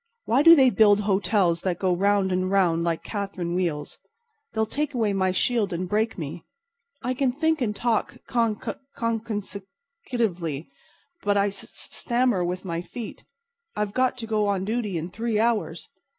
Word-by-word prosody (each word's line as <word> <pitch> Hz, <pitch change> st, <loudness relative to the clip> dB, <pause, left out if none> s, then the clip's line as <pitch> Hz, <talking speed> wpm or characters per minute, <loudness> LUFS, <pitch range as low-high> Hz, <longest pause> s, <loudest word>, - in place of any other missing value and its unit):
"Why 250 Hz, +5 st, +3 dB
do 330 Hz, +2 st, +9 dB
they 265 Hz, -4 st, +5 dB
build 210 Hz, -2 st, +5 dB
hotels 195 Hz, -4 st, +2 dB
that 180 Hz, -3 st, -1 dB
go 185 Hz, -1 st, +1 dB
round 200 Hz, 0 st, +2 dB
and 185 Hz, 0 st, 0 dB
round 175 Hz, -4 st, +2 dB
like 170 Hz, -1 st, -1 dB
catherine 195 Hz, -4 st, -4 dB
wheels? 165 Hz, -5 st, -2 dB, 0.5 s
They'll 220 Hz, 0 st, 0 dB
take 290 Hz, +4 st, -3 dB
away 220 Hz, -4 st, +1 dB
my 190 Hz, -1 st, +1 dB
shield 210 Hz, +1 st, +1 dB
and 180 Hz, +1 st, -2 dB
break 215 Hz, +4 st, 0 dB
me. 160 Hz, 0 st, -6 dB, 0.6 s
I 250 Hz, +2 st, 0 dB
can 255 Hz, 0 st, +1 dB
think 315 Hz, +3 st, 0 dB
and 210 Hz, -4 st, 0 dB
talk 235 Hz, -1 st, 0 dB
con 230 Hz, -3 st, +1 dB
con -, -, -5 dB, 0.2 s
consec 225 Hz, -2 st, -2 dB
sec 200 Hz, +1 st, -8 dB, 0.5 s
secutively, 175 Hz, -, -1 dB, 0.5 s
but 205 Hz, 0 st, +1 dB
I 200 Hz, 0 st, +3 dB
s 200 Hz, -, -6 dB
s -, -, -7 dB
stammer 240 Hz, -6 st, +1 dB
with 180 Hz, +2 st, -3 dB
my 170 Hz, -2 st, -2 dB
feet. 225 Hz, +5 st, -8 dB, 0.5 s
I've 210 Hz, -1 st, -2 dB
got 255 Hz, +1 st, +1 dB
to 235 Hz, -, -5 dB
go 215 Hz, -2 st, +1 dB
on 195 Hz, -2 st, 0 dB
duty 215 Hz, -4 st, -1 dB
in 165 Hz, +3 st, -5 dB
three 225 Hz, +1 st, -1 dB
hours. 210 Hz, -8 st, 0 dB
205 Hz, 180 wpm, -25 LUFS, 180-230 Hz, 0.6 s, do